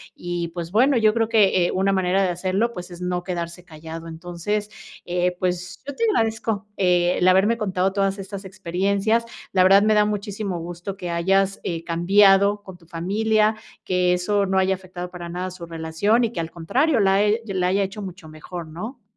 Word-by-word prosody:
Y 175 Hz, -1 st, -4 dB
pues 170 Hz, 0 st, -6 dB
bueno, 255 Hz, +5 st, +4 dB
yo 215 Hz, -1 st, +4 dB
creo 225 Hz, -1 st, +1 dB
que, 195 Hz, -5 st, +4 dB
eh, -, -, 0 dB
una 195 Hz, +1 st, +1 dB
manera 190 Hz, 0 st, +2 dB
de 185 Hz, -, +1 dB
hacerlo, 190 Hz, +6 st, 0 dB
pues 180 Hz, -2 st, -8 dB
es 175 Hz, 0 st, -10 dB
no 180 Hz, 0 st, -2 dB
quedarse 175 Hz, -1 st, -5 dB
callado. 160 Hz, 0 st, -9 dB
Entonces, 175 Hz, +6 st, -4 dB, 0.4 s
eh, 180 Hz, 0 st, 0 dB
pues 180 Hz, 0 st, -3 dB
yo 285 Hz, -, -5 dB
te -, -, -2 dB
agradezco 225 Hz, -, 0 dB
el 180 Hz, -1 st, +2 dB
haberme 195 Hz, +5 st, +4 dB
contado 190 Hz, -3 st, 0 dB
todas 195 Hz, 0 st, 0 dB
estas 195 Hz, +1 st, -7 dB
experiencias. 195 Hz, +4 st, 0 dB, 0.3 s
La 185 Hz, -1 st, +5 dB
verdad 195 Hz, +2 st, +7 dB
me 215 Hz, -, +4 dB
da 210 Hz, 0 st, +4 dB
muchísimo 205 Hz, -3 st, -3 dB
gusto 175 Hz, +3 st, -6 dB
que 175 Hz, -, -5 dB
hayas, 195 Hz, +3 st, +1 dB
eh, 165 Hz, -1 st, -3 dB
cambiado 195 Hz, +4 st, +4 dB
con 190 Hz, -2 st, -11 dB
tu 170 Hz, -, -22 dB
familia, 215 Hz, +6 st, +1 dB, 0.3 s
que 180 Hz, -1 st, +2 dB
eso 200 Hz, +3 st, +1 dB
no 190 Hz, 0 st, 0 dB
haya 190 Hz, 0 st, +3 dB
afectado 180 Hz, -1 st, -8 dB
para 175 Hz, -1 st, -8 dB
nada 180 Hz, +2 st, -4 dB
su 180 Hz, -1 st, -9 dB
relación 165 Hz, +8 st, 0 dB
y 225 Hz, -, -3 dB
que 230 Hz, -, -5 dB
al 165 Hz, 0 st, -6 dB
contrario, 245 Hz, -, +1 dB
la 195 Hz, +1 st, +4 dB
e 210 Hz, +2 st, +2 dB
la 185 Hz, -2 st, 0 dB
haya 195 Hz, +2 st, +2 dB
hecho 195 Hz, +2 st, -5 dB
mucho 185 Hz, -4 st, -8 dB
mejor, 160 Hz, +2 st, -8 dB
¿no? 215 Hz, -, -8 dB
190 Hz, 195 wpm, -23 LUFS, 175-205 Hz, 0.4 s, verdad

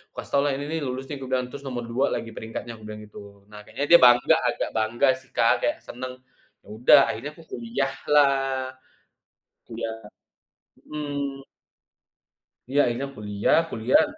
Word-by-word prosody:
kukasih -, -, -8 dB
taulah, 140 Hz, +1 st, +3 dB
"Ini 140 Hz, -, -4 dB
nih 160 Hz, -, -1 dB
lulus 130 Hz, +1 st, -4 dB
nih," 145 Hz, -, -4 dB
kubilang 130 Hz, -1 st, -2 dB
terus, 140 Hz, -1 st, -8 dB
"Nomor 120 Hz, -2 st, -4 dB
2 130 Hz, +3 st, +2 dB
lagi 115 Hz, -, -5 dB
peringkatnya." 115 Hz, +1 st, -7 dB
kubilang 105 Hz, 0 st, -9 dB
gitu. 100 Hz, -1 st, -13 dB
Nah 105 Hz, -, -10 dB
kayaknya 145 Hz, -, -3 dB
dia 170 Hz, -, +10 dB
bangga 125 Hz, +5 st, +6 dB
agak 120 Hz, -, -1 dB
bangga 110 Hz, +4 st, +1 dB
sih 130 Hz, -, -22 dB
Kak -, -, +4 dB
kayak -, -, +1 dB
seneng, 130 Hz, +1 st, -7 dB, 0.5 s
ya -, -, -23 dB
udah 120 Hz, +5 st, +6 dB
akhirnya 145 Hz, +6 st, -6 dB
aku 165 Hz, -, -15 dB
kuliah 120 Hz, +3 st, -2 dB, 0.2 s
lah 135 Hz, -3 st, +2 dB, 1.0 s
iya, 115 Hz, 0 st, -4 dB, 1.0 s
mhm. 145 Hz, -2 st, -4 dB, 1.2 s
Iya, 140 Hz, -, +1 dB
akhirnya 120 Hz, +3 st, -2 dB
kuliah 105 Hz, -2 st, +1 dB
kuliah. 115 Hz, +3 st, +3 dB
125 Hz, 150 wpm, -25 LUFS, 115-140 Hz, 1.2 s, dia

